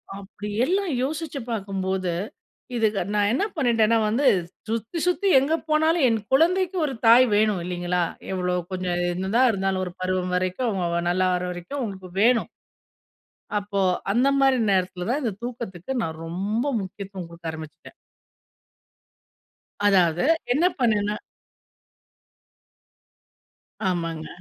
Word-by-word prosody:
அப்டி 200 +1 -8 0.2
எல்லாம் 380 +2 0
யோசிச்சு 305 +1 -3
பாக்கும்போது, 190 -4 -2 0.6
இதுக்கு 220 -4 +1
நான் 205 -1 +3
என்ன 270 - +1
பண்ணிட்டேனா 230 -5 +3
வந்து, 250 +6 +2 0.4
சுத்தி, 230 +8 -3
சுத்தி 360 +3 +1
எங்க 275 +4 0 0.2
போனாலும் 315 -1 +3
என் 225 -1 +1
குழந்தைக்கு 365 +5 +3
ஒரு 275 - -3
தாய் 240 +3 +8
வேணும் 210 -3 +2
இல்லிங்களா? 180 0 -1 0.3
எவ்ளோ 180 -1 -1 0.2
கொஞ்சம் 180 -1 -1
என்னாதான் 200 +8 +2
இருந்தாலும், 190 -1 -1
ஒரு 180 - -7
பருவம் 185 0 -1
வரைக்கும் 185 +7 0
அவங்க 170 -4 -1
நல்லாவுரவரைக்கும் 180 +6 -1
உங்களுக்கு 190 -4 -6
வேணும். 240 0 +3 1.1
அப்போ 200 -1 -2 0.3
அந்த 245 +6 +3
மாரி 270 -1 +4
நேரத்துல 185 -1 0
தான், 275 +5 0
இந்த 230 - 0
தூக்கத்துக்கு 235 -4 -6
நான் 160 -3 -4
ரொம்ப 195 +7 -2 0.2
முக்கியத்துவம் 190 -1 -7
குடுக்க 170 -1 -6
ஆரம்பிச்சுட்டேன். 160 -1 -10 1.9
அதாவது 175 -4 +4 0.3
என்ன 310 +7 +2
பண்ணனுனா, 210 -4 +1 2.7
ஆமாங்க. 165 -3 -3
200 Hz, 115 wpm, -24 LUFS, 180-245 Hz, 2.7 s, தாய்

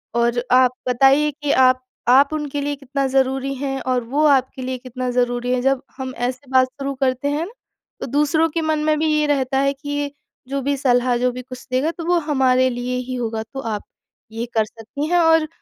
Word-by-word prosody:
और 235 0 +1
आप 255 -1 +6 0.2
बताइए 270 +4 +4
कि 295 0 -3
आप 255 -1 +4 0.3
आप 275 +3 +6
उनके 290 -2 -3
लिए 290 0 -2
कितना 275 0 -3
ज़रूरी 265 +1 0
हैं 270 0 -3
और 255 -1 0
वो 280 +6 0
आपके 265 -2 +2
लिए 255 0 -3
कितना 255 0 -5
ज़रूरी 245 0 0
हैं। 250 - 0
जब 270 0 +1 0.2
हम 260 -1 -5
ऐसे 255 +1 -7
बात 260 -1 +5
शुरू 275 +1 -5
करते 255 +1 0
हैं 300 +3 -1 0.6
तो - - -2
दूसरों 300 +4 +2
के 330 +1 -2
मन 315 -1 0
में 305 -1 +2
भी 315 - +1
ये 300 0 +2
रहता 270 -2 +1
है 275 0 +2
कि 280 +1 -10
ये 290 0 -2 0.4
जो 275 0 -2
भी 280 +2 0
सलाह 250 -2 +2
जो 250 +1 +1
भी 250 +1 -7
कुछ 255 0 -11
देगा 270 +6 +1
तो 330 - -5
वो 350 +1 +3
हमारे 260 -2 +3
लिए 250 0 -3
ही 255 - -2
होगा। 225 -2 -3
तो 270 +5 -9
आप 220 -5 -3 0.5
ये 225 +1 -4
कर 220 -1 +2
सकती 230 +7 -6
हैं 355 - +3
और 325 -2 +4
265 Hz, 215 wpm, -21 LUFS, 250-285 Hz, 0.6 s, आप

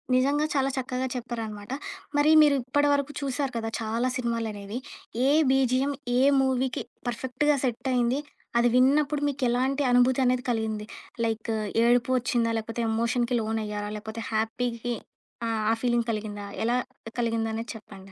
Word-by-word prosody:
నిజంగా 280 +4 +3
చాలా 275 -1 +2
చక్కగా 255 0 -2
చెప్పారనమాట. 225 -3 -5 0.5
మరి 295 +2 +5
మీరు 295 -2 +5
ఇప్పడి 290 +3 +2
వరకు 285 0 0
చూసారు 275 0 -1
కదా! 225 -1 -2
చాలా 230 +3 0
సినిమాలనేవి. 225 -3 -3 0.5
ఏ - - +4 0.2
బీజీఎమ్ 265 +1 +2 0.2
ఏ 255 - +4 0.2
మూవీకి 260 -1 0 0.2
పర్ఫెక్ట్‌గా 260 +5 +1
సెట్టయింది. 250 +1 0 0.4
అది 240 - +4
విన్నప్పుడు 280 +3 +3
మీకెలాంటి 265 +1 +1
అనుభూతనేది 250 0 +3
కలిగింది. 220 -2 -1 0.4
లైక్ 225 0 -2 0.3
ఏడుపు 240 +1 +3
వచ్చిందా? 240 -2 +1
లేకపోతే 225 +1 -3
ఎమోషన్‌కి 235 +2 +1
లోనయ్యారా? 210 -1 -3
లేకపోతే 220 +2 -6
హ్యాపీకి 235 +2 -1 0.5
ఆ! - - -1 0.2
ఆ - - +4
ఫీలింగ్ 240 -1 +1
కలిగిందా? 210 -1 -4 0.2
ఎలా 235 +2 +2 0.4
కలిగిందనేది 225 -1 -1
చెప్పండి? 195 -3 -12
245 Hz, 125 wpm, -27 LUFS, 225-260 Hz, 0.5 s, మరి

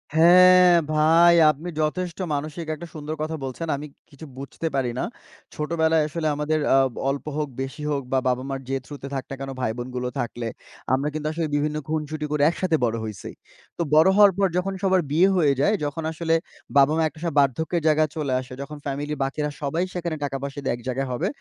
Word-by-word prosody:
হ্যাঁ, 180 +2 +7 0.2
ভাই 165 +3 +5 0.2
আপনি 155 +4 -9
যথেষ্ট 170 +3 -2 0.2
মানসিক 155 +3 -4
একটা 170 +3 -9
সুন্দর 155 0 -5
কথা 155 +1 -2
বলছেন। 135 +5 -5
আমি 150 +2 -7 0.2
কিছু 150 +1 -12
বুঝতে 140 +4 -5
পারি 130 -3 0
না। - - 0 0.5
ছোটবেলায় 160 0 +1
আসলে 155 +1 -2
আমাদের, 150 +1 0
আ - - +6 0.3
অল্প 140 0 -3
হোক 150 - -1
বেশি 135 +3 -6
হোক 140 -1 0
বা 130 - +4
বাবা-মার 130 +2 -1
যে 135 - 0
থ্রুতে 145 -2 -8
থাক 135 -1 -2
না 135 - -5
কেনো, 135 0 -5
ভাইবোনগুলো 125 +1 -3
থাকলে 120 0 -3 0.5
আমরা 135 +3 +1
কিন্তু 155 0 -3
আসলে 160 0 -2
বিভিন্ন 150 +1 0
খুনসুটি 155 0 -3
করে 150 -1 +1
একসাথে 170 -1 0
বড় 115 -1 -1
হইছি। 105 -3 -7 0.5
তো - - -2
বড় 155 +3 +7
হওয়ার 205 -1 +7
পর 200 -1 +3
যখন 190 +2 -1
সবার 190 -1 +3
বিয়ে 170 +5 +5
হয়ে 155 -6 +3
যায়, 205 - +3
যখন 150 +3 -4
আসলে 165 0 0 0.4
বাবা-মা 150 +4 +4
একটা 155 +1 -10
স - - -2
বার্ধক্যের 160 +5 +1
জায়গায় 155 0 +3
চলে 145 -4 -1
আসে, 130 0 -11
যখন 150 +2 -7
ফ্যামিলির 145 +2 -3
বাকিরা 150 +2 -2
সবাই 160 +5 -1
সেখানে 170 -2 -3
টাকা-পয়সা 140 0 -4
দিয়ে 130 - 0
এক 120 - -12
জায়গায় 135 +1 -1
হবে, 125 - -1
150 Hz, 190 wpm, -24 LUFS, 135-165 Hz, 0.5 s, হ্যাঁ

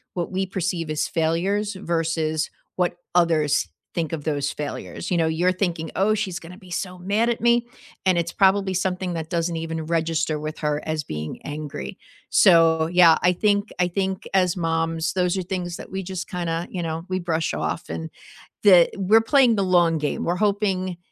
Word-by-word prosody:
what 175 +1 -3
we 190 +1 -1
perceive 175 -4 -2
as 155 - -1
failures 190 +6 0
versus 165 -4 -1 0.3
what 180 -1 +1 0.2
others 155 - +2 0.3
think 165 -1 -2
of 150 - -4
those 145 -2 -1
failures. 150 +4 -6
You 175 - +2
know, 165 -1 +2
you're 170 +3 +2
thinking, 170 -4 -2
"Oh, 205 +3 +3
she's 190 -5 -3
gonna 175 +2 -11
be 185 -3 -15
so 180 +1 -4
mad 205 +6 +1
at 235 - -1
me," 235 0 +3 0.4
and 185 -2 +3
it's 170 0 -1
probably 195 -1 +3
something 185 -1 -1
that 160 -1 -5
doesn't 170 0 -1
even 160 -1 -4
register 165 -1 0
with 155 +1 -6
her 150 -1 -1
as 155 -1 -2
being 75 -4 -6
angry. 150 +5 -6 0.3
So, 165 -4 +5
yeah, 170 -1 +6
I 180 - +5
think 205 +2 +1
I 180 - +3
think, 190 +1 -2
as 185 -2 +2
moms, 165 -1 -1
those 180 0 +1
are - - 0
things 175 -1 -4
that - - -10
we 190 0 -3
just 185 0 -5
kinda, 170 -1 -2
you 180 - -3
know, 165 0 -4
we 185 0 -1
brush 165 -2 -1
off, - - -3
and 80 0 -5 0.5
the 180 -4 +7
we're 205 +4 +4
playing 245 -1 +4
the 200 - +1
long 175 -3 +3
game. 150 -1 -2
We're 175 - 0
hoping 195 -3 0
175 Hz, 190 wpm, -23 LUFS, 160-190 Hz, 0.5 s, the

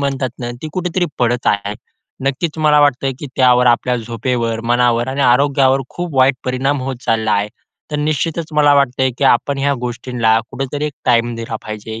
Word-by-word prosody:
म्हणतात 135 -3 -1
ना, 120 -1 -4
ती 155 - -4
कुठेतरी 180 0 -1
पडत 120 0 0
आहे. 100 +1 0 0.5
नक्कीच 150 +4 -2
मला 150 -1 +4
वाटते, 135 -2 +2
की - - -6
त्यावर, 125 -1 +4
आपल्या 125 +1 +2
झोपेवर 115 0 -2
मनावर 120 0 +2
आणि 135 +2 -3
आरोग्यावर 135 +1 +3
खूप 175 -4 -5
वाईट 130 0 +4
परिणाम 130 +2 0
होत 130 -1 -4
चालला 115 -1 +1
आहे. 100 +1 +1 0.4
तर 150 - -2
निश्चितच 155 +2 -1
मला 145 -1 +4
वाटतं 135 -2 +1
आहे, 130 - +3
की 140 - 0
आपण 135 +2 +2
ह्या 140 +1 +1
गोष्टींना 120 -2 0
कुठेतरी 145 +2 -3
एक 150 - -5
टाईम 120 -1 +2
दिला 115 -1 -5
पाहिजे 110 +1 -7
130 Hz, 180 wpm, -17 LUFS, 120-140 Hz, 0.5 s, मला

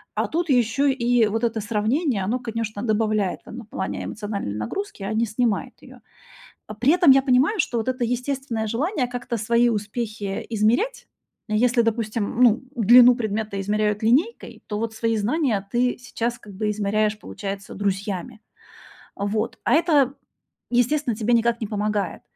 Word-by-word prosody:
А - - 0
тут 335 0 -2
ещё 245 +2 +2
и 245 -4 +2
вот 225 +3 -2
это 225 -1 0
сравнение- 220 - 0
оно, 235 +7 -1
конечно, 225 -3 -4
добавляет, 215 -3 0
там, 230 - -10
ну, 245 - -7
в - - -34
плане 190 - -4
эмоциональной 205 - -4
нагрузки, 305 - -5
а 200 - -3
не 225 +2 +1
снимает 220 -1 -1
её. - - -14 0.7
Э, - - -5
при 275 +7 +4
этом 350 -6 +6
я 270 0 +6
понимаю, 270 - +2
что 240 -6 0
вот 225 +3 -1
это 250 -2 -1
естественное 250 -2 -2
желание 275 - -1
как-то 245 0 -4
свои 235 +3 +2
успехи 210 -2 -3
измерять 235 - 0 0.4
если, 235 +3 +3
допустим, 225 0 -1
ну, 235 +1 +5
длину 245 +2 +7
предмета 215 -3 -3
измеряют 210 +1 0
линейкой, 280 - +1
то 210 - -3
вот 225 0 -3
свои 225 0 0
знания 215 -3 0
ты 245 +1 +1
сейчас 240 -1 -3
как 205 - -13
бы 210 +2 -2
измеряешь, 210 0 0
получается, 200 -2 -7
друзьями. 200 +2 -3 0.8
Вот. 215 +3 -2
А - - +3
это, 295 -5 +3 0.6
естественно, 245 +2 +1
тебе 225 +2 0
никак 235 0 +2
не 220 - -3
помогает. 210 -1 -2
230 Hz, 160 wpm, -23 LUFS, 210-250 Hz, 0.8 s, длину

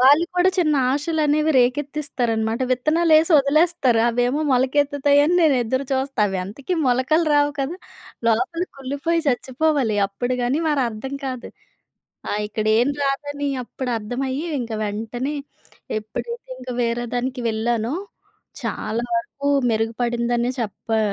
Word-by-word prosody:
వాళ్ళు 285 +6 +6
కూడా 360 +1 +5
చిన్న 310 -4 +3 0.2
ఆశలు 310 +3 -1
అనేవి 305 +2 +2
రేకెత్తిస్తారన్నమాట. 245 -4 0
విత్తనాలు 310 +6 +2
వేసి 325 +3 +3
వదిలేస్తారు 280 -4 +3
అవేమో 245 +5 +1
మొలకెత్తుతాయని 285 +4 +3
నేను 310 -4 +5
ఎదురు 260 +4 -1
చూస్తా 265 -3 -1
అవి 190 -1 -2
అంతకి 265 - -4
మొలకలు 260 +7 +2
రావు 290 0 +4
కదా, 280 +6 -2 0.5
లోపల 280 +10 +1
కుళ్లిపోయి 285 +5 -1
చచ్చిపోవాలి 260 -2 +1
అప్పుడు 245 +6 -3
గాని 260 +6 +1
మరి 290 -3 +2
అర్థం 235 +5 -6
కాదు. 255 -2 -5 0.8
ఆ! - - -1
ఇక్కడ 215 0 -3
ఏం 245 +3 +3
రాదని 285 +1 -2 0.2
అప్పుడు 255 +1 -5
అర్థమయ్యి 260 +8 -3
ఇంక 235 -1 -5
వెంటనే 225 +7 -3 0.6
ఎప్పుడైతే 470 - -6
ఇంకా 255 0 -6
వేరే 235 +1 -1
దానికి 250 +1 -2
వెళ్ళానో 225 +3 -1 0.7
చాలా 225 +3 -2
వరకు 330 -5 -4 0.2
మెరుగుపడిందనే 235 +2 0
చెప్పా 225 0 -2
260 Hz, 125 wpm, -22 LUFS, 235-295 Hz, 0.8 s, వాళ్ళు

